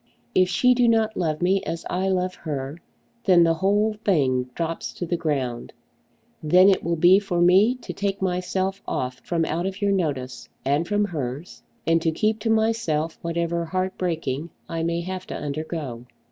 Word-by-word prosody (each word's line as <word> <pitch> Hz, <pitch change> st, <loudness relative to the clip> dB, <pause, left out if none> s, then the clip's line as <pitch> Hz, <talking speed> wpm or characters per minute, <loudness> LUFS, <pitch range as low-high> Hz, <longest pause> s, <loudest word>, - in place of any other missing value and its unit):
If 185 Hz, -1 st, +4 dB
she 250 Hz, +7 st, +4 dB
do 245 Hz, -1 st, +3 dB
not 225 Hz, -1 st, +2 dB
love 160 Hz, -2 st, -1 dB
me 190 Hz, +2 st, +3 dB
as 165 Hz, -, -5 dB
I 185 Hz, +1 st, -1 dB
love 185 Hz, -1 st, 0 dB
her, 145 Hz, -1 st, -5 dB, 0.5 s
then 180 Hz, -3 st, +6 dB
the 165 Hz, 0 st, +4 dB
whole 205 Hz, +6 st, +2 dB
thing 130 Hz, -9 st, +2 dB
drops 165 Hz, 0 st, -3 dB
to 175 Hz, -, -4 dB
the 175 Hz, -, -1 dB
ground. 140 Hz, -8 st, -2 dB, 0.7 s
Then 180 Hz, +5 st, +6 dB
it 195 Hz, -, +2 dB
will 170 Hz, +1 st, 0 dB
be 175 Hz, +4 st, +6 dB
for 190 Hz, -4 st, -2 dB
me 190 Hz, +8 st, +5 dB
to 250 Hz, -, -8 dB
take 200 Hz, -1 st, -2 dB
myself 190 Hz, +1 st, -1 dB
off 130 Hz, 0 st, -3 dB
from 165 Hz, -2 st, 0 dB
out 170 Hz, +4 st, -1 dB
of 195 Hz, +1 st, -5 dB
your 205 Hz, -1 st, +1 dB
notice, 135 Hz, -9 st, -2 dB, 0.2 s
and 145 Hz, +5 st, +1 dB
from 205 Hz, +1 st, +1 dB
hers, 145 Hz, -3 st, -5 dB, 0.2 s
and 165 Hz, 0 st, +3 dB
to 165 Hz, -, +1 dB
keep 215 Hz, +7 st, 0 dB
to 225 Hz, -, -2 dB
myself 220 Hz, -9 st, 0 dB
whatever 170 Hz, 0 st, -1 dB
heart 185 Hz, +3 st, -2 dB
breaking 165 Hz, -4 st, -2 dB, 0.2 s
I 165 Hz, 0 st, -3 dB
may 170 Hz, +1 st, -1 dB
have 185 Hz, +1 st, -6 dB
to -, -, -5 dB
undergo. 145 Hz, -5 st, -5 dB
175 Hz, 180 wpm, -24 LUFS, 155-195 Hz, 0.7 s, then